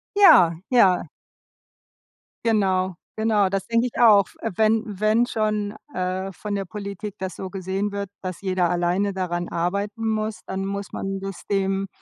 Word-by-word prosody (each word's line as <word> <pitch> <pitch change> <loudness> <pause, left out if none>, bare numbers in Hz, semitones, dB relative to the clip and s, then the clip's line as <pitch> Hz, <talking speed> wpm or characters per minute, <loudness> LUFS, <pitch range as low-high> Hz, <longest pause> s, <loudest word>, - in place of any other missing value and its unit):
Ja, 180 - +7
ja. 190 -9 +4 1.4
Genau, 190 -4 +2 0.2
genau, 215 -3 +2
das 195 -1 -2
denke 230 +1 +2
ich 245 - -6
auch. 210 -5 +7
Äh, - - -2
wenn 220 0 +3
wenn 215 +3 +2
schon, 215 -2 -1 0.2
äh, 185 +1 -2
von 205 +2 -5
der 195 - -2
Politik 200 +1 -6
das 190 -1 -5
so 190 - -6
gesehen 195 +2 -3
wird, 200 -1 -3
dass 185 -2 -5
jeder 185 -3 +1
alleine 180 +3 +1
daran 175 -2 -2
arbeiten 200 +6 -2
muss, 215 0 -2
dann 190 0 -3
muss 200 0 -4
man 195 0 -3
das 195 -1 -6
dem, 195 0 0
195 Hz, 155 wpm, -23 LUFS, 185-215 Hz, 1.4 s, Ja